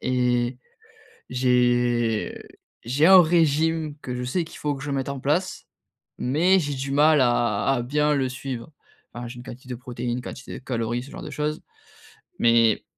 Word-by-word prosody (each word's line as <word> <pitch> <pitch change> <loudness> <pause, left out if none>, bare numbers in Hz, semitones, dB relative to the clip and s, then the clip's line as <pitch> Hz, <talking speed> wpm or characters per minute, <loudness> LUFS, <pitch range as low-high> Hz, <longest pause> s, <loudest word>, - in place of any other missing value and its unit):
et 125 -1 0 0.7
j'ai 120 -2 +1 0.5
j'ai 135 +7 +2
un 190 0 +9
régime 160 -1 +1
que 125 - -5
je 125 0 -4
sais 165 +8 -1
qu'il 160 - -12
faut 150 -1 -1
que 135 - -8
je 145 - -4
mette 135 -1 -2
en 140 -1 -4
place. 160 +8 -1 0.5
Mais 170 +9 +3
j'ai 145 -3 -3
du 135 +1 -4
mal 150 +1 +5
à 120 -4 +1
à 120 - -1
bien 150 +4 +1
le 135 -2 0
suivre. 130 -1 -6 0.4
Enfin, 120 0 -6
j'ai 120 - -9
une 120 - -9
quantité 125 +1 -11
de - - -2
protéines, 125 0 -5
une - - -7
quantité 130 +1 -9
de 130 - -19
calories, 120 -1 -2
ce 135 - -12
genre - - -9
de - - -7
choses. 150 +1 -3 0.8
Mais, 115 -2 +3
130 Hz, 180 wpm, -24 LUFS, 120-150 Hz, 0.8 s, un